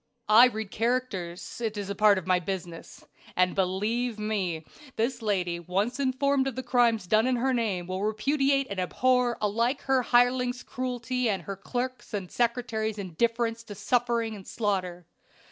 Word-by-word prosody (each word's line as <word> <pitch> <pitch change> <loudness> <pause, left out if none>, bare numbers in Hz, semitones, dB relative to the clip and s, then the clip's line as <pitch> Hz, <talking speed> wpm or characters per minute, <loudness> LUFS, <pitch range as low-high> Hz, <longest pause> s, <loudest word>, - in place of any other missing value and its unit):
"I 230 +4 +9
read 220 -4 -5
characters; 225 -6 -2
it 220 -2 -2
is 200 -1 -4
a - - -1
part 210 0 +5
of 190 - -4
my 185 -1 +3
business; 175 -2 -6 0.3
and, 180 0 +3
believe 210 +5 0
me, 190 -7 -2 0.3
this 240 +2 -1
lady 180 -5 -1
once 200 - -1
informed 270 0 +1
of 265 - -3
the 260 - -4
crimes 240 -4 +2
done 215 +6 +3
in 255 - +2
her 260 +2 +1
name 210 -7 -1
will 185 +1 -4
repudiate 275 +6 +1
and 200 - -3
abhor 250 +5 +1
alike 230 +6 0
her 265 -1 +2
hireling's 245 +1 +2
cruelty 250 -1 -2
and 190 -4 -1
her 195 +4 -5
clerks' 245 +3 -4
and 190 -3 -5
secretaries' 230 -3 -1
indifference 230 +5 -1
to 205 - -8
suffering 230 +1 0
and 195 -2 -11
slaughter. 185 -5 -2
225 Hz, 160 wpm, -27 LUFS, 195-245 Hz, 0.3 s, I